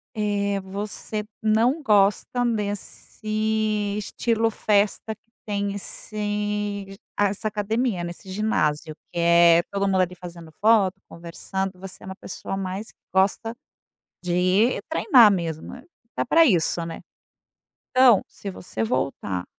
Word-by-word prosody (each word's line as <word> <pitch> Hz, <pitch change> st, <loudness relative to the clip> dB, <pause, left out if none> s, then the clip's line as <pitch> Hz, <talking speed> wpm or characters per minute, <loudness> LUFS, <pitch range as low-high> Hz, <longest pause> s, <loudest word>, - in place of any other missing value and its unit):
eh, 200 Hz, -1 st, 0 dB
você 205 Hz, +2 st, -4 dB, 0.2 s
não 230 Hz, +8 st, +2 dB
gosta 210 Hz, +2 st, +2 dB
desse 215 Hz, -1 st, -2 dB
estilo 225 Hz, +2 st, 0 dB
festa 210 Hz, 0 st, +1 dB
que -, -, -48 dB, 0.2 s
tem 200 Hz, -1 st, -2 dB
esse 205 Hz, -1 st, -3 dB, 0.2 s
a 205 Hz, -, +4 dB
essa 205 Hz, +3 st, -4 dB
academia, 215 Hz, -1 st, -1 dB
né, 170 Hz, -, -4 dB
esse 180 Hz, +2 st, -12 dB
ginásio. 155 Hz, -7 st, 0 dB, 0.2 s
Que 175 Hz, -, -4 dB
é 170 Hz, 0 st, +6 dB
todo 200 Hz, 0 st, 0 dB
mundo 190 Hz, -1 st, +3 dB
ali 180 Hz, 0 st, -1 dB
fazendo 170 Hz, -2 st, -10 dB
foto, 200 Hz, -3 st, +3 dB
conversando, 185 Hz, +3 st, -5 dB
você 190 Hz, 0 st, -10 dB
é -, -, -10 dB
uma 190 Hz, 0 st, -7 dB
pessoa 195 Hz, +1 st, -6 dB
mais 195 Hz, +3 st, -4 dB
que -, -, -42 dB
gosta 200 Hz, +4 st, +1 dB, 0.7 s
de 180 Hz, -1 st, -1 dB
ir 185 Hz, +7 st, +3 dB
treinar 245 Hz, -, +6 dB
mesmo, 165 Hz, -4 st, -3 dB
né. 250 Hz, -, -11 dB, 0.3 s
Tá -, -, 0 dB
pra 330 Hz, +7 st, +5 dB
isso, 170 Hz, -, +2 dB
né. 165 Hz, 0 st, -7 dB, 0.9 s
Então, 255 Hz, -5 st, +6 dB
se 200 Hz, -, -8 dB
você 180 Hz, -11 st, -5 dB
voltar, 110 Hz, -6 st, -2 dB
200 Hz, 135 wpm, -24 LUFS, 185-215 Hz, 0.9 s, é